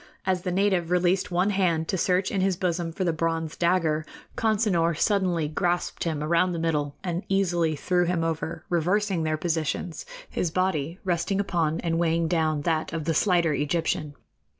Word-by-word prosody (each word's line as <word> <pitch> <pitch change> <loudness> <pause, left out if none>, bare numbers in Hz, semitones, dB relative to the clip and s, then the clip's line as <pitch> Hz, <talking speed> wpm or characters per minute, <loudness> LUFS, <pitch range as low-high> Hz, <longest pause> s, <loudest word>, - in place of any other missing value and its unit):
As 185 -1 +1
the 180 0 -2
native 185 -2 +1
released 180 +1 +2
one 180 +3 +1
hand 170 -5 +1
to - - +1
search 185 +1 +1
in 195 - 0
his 190 -1 +2
bosom 175 -2 -1
for 185 - -3
the 170 -2 +1
bronze 165 0 -2
dagger, 170 -3 +1 0.3
Consinor 200 -8 +1
suddenly 185 -7 +1
grasped 175 +3 -1
him 155 -3 -1
around 170 +3 +2
the - - -3
middle 150 -3 -1
and 175 -1 -2
easily 175 -5 +1
threw 180 +4 +1
him 170 -1 0
over, 165 0 -3
reversing 185 +2 +1
their 155 -1 0
positions, 160 +1 -2 0.2
his 175 - -2
body 170 -2 -1
resting 185 +1 0
upon 165 -5 0
and 165 -1 0
weighing 165 -1 +1
down 160 -3 +1
that 160 0 -1
of 160 -2 -3
the 165 - +1
slighter 170 -2 +2
Egyptian. 150 0 -1
170 Hz, 175 wpm, -26 LUFS, 160-185 Hz, 0.3 s, released